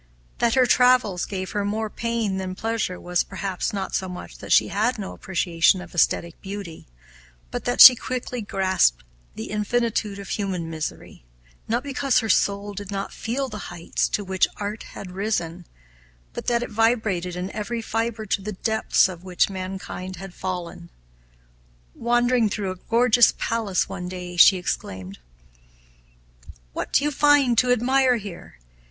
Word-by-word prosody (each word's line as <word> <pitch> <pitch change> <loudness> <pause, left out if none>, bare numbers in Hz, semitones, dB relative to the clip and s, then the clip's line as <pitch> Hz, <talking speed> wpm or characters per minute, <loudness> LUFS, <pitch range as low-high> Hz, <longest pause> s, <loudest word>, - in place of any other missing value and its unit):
That 235 0 +2
her 260 -1 +5
travels 250 -8 +3
gave 185 -2 -5
her 205 - -1
more 215 +2 -1
pain 230 -3 -2
than 185 -1 -4
pleasure 225 -4 -2
was, 180 0 0
perhaps, 190 -1 -3
not 195 -2 -4
so 190 - -1
much 180 - -9
that - - -8
she - - +5
had 220 +6 0
no 200 -3 -6
appreciation 175 -1 +1
of 180 - -11
aesthetic 170 -1 +1
beauty, 195 -4 -8 0.6
but - - -5
that 120 - +2
she 255 - +13
quickly 250 0 -4
grasped 190 - +1 0.3
the 110 - -6
infinitude 215 -1 -1
of 200 -1 -9
human 185 -5 -3
misery; 155 - -6 0.4
not 235 +3 0
because 275 -1 0
her 225 -2 +1
soul 200 +1 +1
did 200 0 -7
not 195 -1 -4
feel 260 +4 -3
the 210 -4 -7
heights 170 -1 -2
to 205 - -1
which 190 -1 +1
art 210 +1 -4 0.2
had 185 - -8
risen, 180 -4 -3 0.7
but - - -7
that 240 0 +2
it 245 - -7
vibrated 215 -6 +1
in 180 +2 -4
every 215 +3 -4
fiber 225 0 -2
to 200 -1 -1
the 210 +2 -5
depths 220 +3 +2
to 185 -2 -3
which 180 +2 0
mankind 185 0 -6
had 190 +1 -9
fallen. 175 -2 -5 1.0
Wandering 240 -1 +2
through 200 -2 -3
a - - -6
gorgeous 240 0 +5
palace 220 -5 0
one 180 0 -6
day, 180 -1 -7
she 185 +2 +7
exclaimed, 95 - -5 1.5
"What - - -4
do - - +3
you 295 - +1
find 290 -3 +4
to 250 -1 +2
admire 255 +1 +3
here? 200 - -8
200 Hz, 160 wpm, -24 LUFS, 185-230 Hz, 1.5 s, she